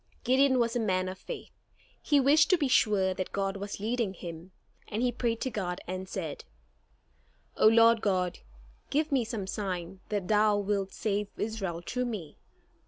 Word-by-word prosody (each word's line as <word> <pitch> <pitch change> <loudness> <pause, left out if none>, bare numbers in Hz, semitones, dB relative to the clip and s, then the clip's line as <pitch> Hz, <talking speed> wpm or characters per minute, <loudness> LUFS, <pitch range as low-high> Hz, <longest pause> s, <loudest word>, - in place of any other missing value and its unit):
Gideon 260 +1 +4
was 235 -1 +1
a - - +2
man 185 -4 0
of 185 0 -6
faith. - - -8 0.5
He 290 -2 +3
wished 295 +4 +5
to 370 - +5
be 295 -4 +1
sure 205 -6 +3
that 185 0 -4
God 195 0 -1
was 200 +1 -5
leading 220 -2 -1
him, 170 +1 -8 0.4
and 220 +3 -2
he 250 - +2
prayed 235 -1 -1
to 260 - -1
God 180 -5 -3
and 185 +1 -5
said: 165 -8 -5 1.1
"O - - +5
Lord 230 0 +6
God, 185 -3 0 0.5
give 305 +2 0
me 265 -3 +3
some 220 -3 -4
sign 190 -2 -4
that 205 -4 -2
thou 210 0 +4
wilt 200 -1 -1
save 210 -1 -1
Israel 195 -6 -3
through 250 +5 -1
me. 200 -11 -6
210 Hz, 170 wpm, -29 LUFS, 190-235 Hz, 1.1 s, Lord